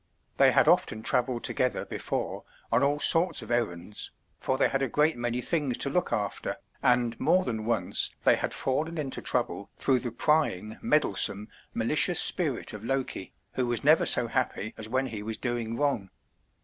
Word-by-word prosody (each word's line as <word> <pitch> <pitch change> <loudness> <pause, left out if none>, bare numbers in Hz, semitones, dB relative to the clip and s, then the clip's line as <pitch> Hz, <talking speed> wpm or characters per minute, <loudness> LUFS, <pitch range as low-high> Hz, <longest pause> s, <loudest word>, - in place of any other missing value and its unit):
They - - +6
had - - +3
often 110 0 +2
travelled 125 0 0
together 125 -1 -1
before - - -4 0.3
on - - +3
all 145 +1 +1
sorts 165 +4 +4
of - - -9
errands, 105 -4 -2 0.3
for 130 - -1
they - - +3
had 135 - -1
a 135 - +1
great 150 +6 +2
many 120 +1 -2
things 145 -5 -1
to 140 - -2
look 180 - 0
after, 100 -1 -2 0.3
and 120 -2 +2
more 185 +1 +3
than 110 -2 -3
once 115 -1 +1
they - - +5
had - - -3
fallen 155 +5 -2
into 140 -4 -2
trouble 120 -5 -2
through 130 -2 +2
the 125 - -4
prying, 115 - 0
meddlesome, 105 -7 +1 0.3
malicious - - +3
spirit - - +1
of 105 0 -8
Loke, 135 +2 -1 0.4
who 125 -1 -1
was 120 -2 -1
never - - +5
so - - +4
happy 110 - -2
as 110 0 -6
when 130 +2 0
he 110 -5 -5
was 110 +1 -4
doing 120 -2 -3
wrong. 135 -10 -1
125 Hz, 175 wpm, -28 LUFS, 110-140 Hz, 0.4 s, They